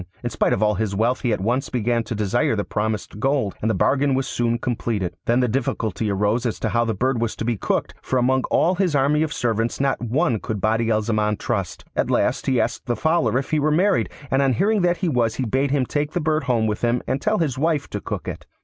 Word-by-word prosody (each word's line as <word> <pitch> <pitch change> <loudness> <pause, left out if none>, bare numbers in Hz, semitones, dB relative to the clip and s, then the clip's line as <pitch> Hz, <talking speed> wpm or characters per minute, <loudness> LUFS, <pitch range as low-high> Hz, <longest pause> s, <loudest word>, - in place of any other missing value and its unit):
In 120 - -2
spite 110 - +1
of 100 - +1
all 105 0 +3
his 105 -2 -2
wealth 115 +5 +1
he 120 - 0
at 105 - -1
once 125 +7 0
began 120 -1 0
to 115 - -4
desire 105 +2 +1
the 105 - -1
promised 105 -1 -3
gold, 135 -5 +1
and 110 - 0
the 110 - +1
bargain 140 0 +2
was 135 0 0
soon 120 0 0
completed. 110 -7 -2
Then 120 +2 +3
the 125 - +2
difficulty 110 -4 -1
arose 105 +4 +1
as 115 - -3
to - - 0
how 120 0 +1
the 115 -2 -1
bird 125 +3 0
was 115 -1 -1
to - - -4
be 120 0 +1
cooked; 100 - -1
for 130 - -1
among 130 +1 +2
all 175 +3 +2
his 180 -4 0
army 145 +2 +3
of 160 -1 0
servants 115 -2 -1
not 135 -1 0
one 120 +1 +1
could 105 0 -4
Badi 110 +2 +1
al 110 -1 +2
Zaman 105 -1 0
trust. 100 -9 -3
At - - 0
last - - +1
he 130 -3 +2
asked 120 - -2
the 120 - +1
Fowler 160 +3 +1
if 135 - -3
he 155 - +2
were 150 +1 +2
married, 185 +6 +2 0.2
and 135 - +3
on 135 -2 +3
hearing 205 - +2
that 175 0 +2
he 185 - -1
was 120 -6 +1
he 130 - -2
bade 135 +5 +1
him 135 -2 +1
take 145 +3 -2
the 175 - 0
bird 155 -2 0
home 120 -4 +1
with 105 -1 -2
him 120 0 +1
and 130 +2 -1
tell 215 0 +1
his 140 -8 -1
wife 155 -2 +1
to 105 - -4
cook - - -5
it. - - -6
120 Hz, 260 wpm, -22 LUFS, 110-140 Hz, 0.2 s, all